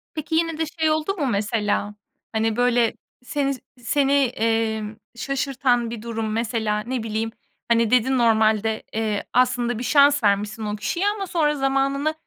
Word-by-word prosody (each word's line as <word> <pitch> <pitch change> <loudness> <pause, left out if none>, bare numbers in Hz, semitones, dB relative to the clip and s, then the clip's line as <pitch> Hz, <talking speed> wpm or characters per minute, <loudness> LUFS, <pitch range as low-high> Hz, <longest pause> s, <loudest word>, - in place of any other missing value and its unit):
Peki, 310 +1 -3
yine 330 -1 +1
de 325 - 0 0.2
şey 315 -1 +3
oldu 310 +5 0
mu 295 - -1
mesela, 210 -1 -1 0.4
hani, 220 -1 0
böyle, 245 -1 +2 0.3
seni 275 +1 -1 0.3
seni, 275 +3 +2
emm, 225 -5 0 0.2
şaşırtan 260 -2 0
bir 230 -2 -6
durum 225 -1 -3
mesela? 220 -1 -1
Ne 240 +2 -3
bileyim, 225 0 -2 0.4
hani, 230 -1 +2
dedin, 255 +1 +3
normalde, 220 -1 +2
eee, 215 -2 -1
aslında 245 -2 +2
bir - - -4
şans 285 0 +4
vermişsin 210 +2 +1
o 210 0 -2
kişiye 340 - -1
ama 410 -2 -1
sonra 300 -4 +1
zamanını, 275 +2 0
235 Hz, 150 wpm, -23 LUFS, 220-275 Hz, 0.4 s, şans